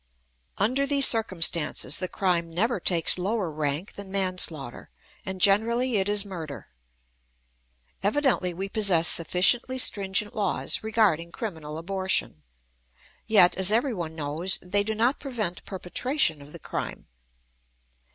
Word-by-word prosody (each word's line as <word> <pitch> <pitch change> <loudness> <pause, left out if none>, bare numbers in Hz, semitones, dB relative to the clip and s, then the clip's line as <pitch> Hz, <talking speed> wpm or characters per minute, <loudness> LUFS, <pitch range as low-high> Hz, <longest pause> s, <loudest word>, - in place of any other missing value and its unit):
Under 255 +8 +1
these 280 -1 +7
circumstances, 170 - +1
the 185 - -2
crime 175 -3 -1
never 215 +6 0
takes 170 0 0
lower 195 -2 -2
rank 150 +4 -3
than 200 -1 -9
manslaughter; 185 -9 -1 0.4
and 190 0 -5
generally 230 +5 +2
it 195 +1 0
is 205 0 +1
murder. 165 -7 -8 1.3
Evidently 210 -3 +1
we 190 +3 -5
possess 195 -6 +3
sufficiently 185 +10 +2
stringent 200 -3 0
laws 210 - -1
regarding 210 -7 +1
criminal 160 -9 -6
abortion; 190 - -1 0.9
yet, 185 -5 +5
as 190 +1 +2
everyone 215 - -1
knows, 160 +5 -1
they 200 +3 +1
do 215 +2 -3
not 240 +5 +1
prevent 225 -10 -4
perpetration 190 - -1
of 140 +1 -13
the - - -9
crime. - - -6
190 Hz, 120 wpm, -26 LUFS, 170-220 Hz, 1.3 s, these